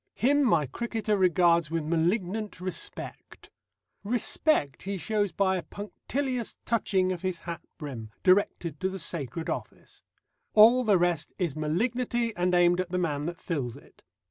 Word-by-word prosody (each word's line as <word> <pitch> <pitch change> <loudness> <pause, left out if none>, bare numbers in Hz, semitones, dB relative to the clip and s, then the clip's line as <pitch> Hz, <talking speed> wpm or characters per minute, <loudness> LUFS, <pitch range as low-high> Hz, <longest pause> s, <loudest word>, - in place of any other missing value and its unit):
Him 285 +4 +3
my 170 - +3
cricketer 220 - -2
regards 175 -3 +3
with 165 -1 -1
malignant 180 +6 -1
respect. 185 0 -6 0.5
Respect 225 - 0
he 195 +1 -3
shows 205 +1 0
by 190 +1 +1
a - - -3
punctilious 245 - -4
touching 195 -5 +1
of 180 -2 -4
his 185 -2 -2
hat 170 -1 -6 0.2
brim, 130 -8 -7
directed 180 -5 +2
to 190 - 0
the 190 - -5
sacred 160 -3 -3
office; - - -6 0.5
all 230 +4 +8
the 210 -4 +4
rest 175 -3 0
is 170 -7 -1
malignity, 230 +8 -1
and 180 0 +1
aimed 175 0 +4
at 185 - -6
the 180 - -1
man 150 -4 -1
that 170 0 -5
fills 130 -8 -3
it. - - -19
185 Hz, 150 wpm, -28 LUFS, 165-215 Hz, 0.5 s, all